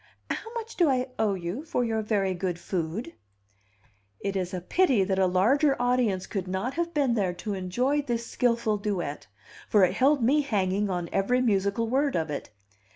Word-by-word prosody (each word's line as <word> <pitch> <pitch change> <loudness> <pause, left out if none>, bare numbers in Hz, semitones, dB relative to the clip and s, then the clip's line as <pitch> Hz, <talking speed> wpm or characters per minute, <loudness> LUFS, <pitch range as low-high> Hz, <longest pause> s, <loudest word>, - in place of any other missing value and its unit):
How 450 - -4
much 460 -1 -6
do 345 -5 +4
I 255 -1 0
owe 210 -3 +2
you 180 - -4
for 310 -6 -1
your 225 -1 0
very 205 -3 0
good 180 -1 -2
food?" 170 +2 -4 1.1
It 200 0 -3
is 185 -2 -2
a 185 - -3
pity 255 - +2
that 190 0 0
a 190 - +4
larger 265 +11 +3
audience 245 -6 +1
could 195 -3 -4
not 190 +8 -2
have 340 0 -2
been 285 -6 +1
there 195 -6 0
to 205 +4 -5
enjoy 245 +10 0
this 235 -4 -2
skilful 235 -4 +1
duet, 185 -8 -3 0.4
for 205 -3 +5
it 180 0 +3
held 270 +3 +3
me 285 +6 +4
hanging 205 -6 0
on 175 -2 -2
every 220 +6 +2
musical 205 -1 +1
word 275 +3 +1
of 160 -2 -1
it. 145 - -5
210 Hz, 185 wpm, -27 LUFS, 185-255 Hz, 1.1 s, for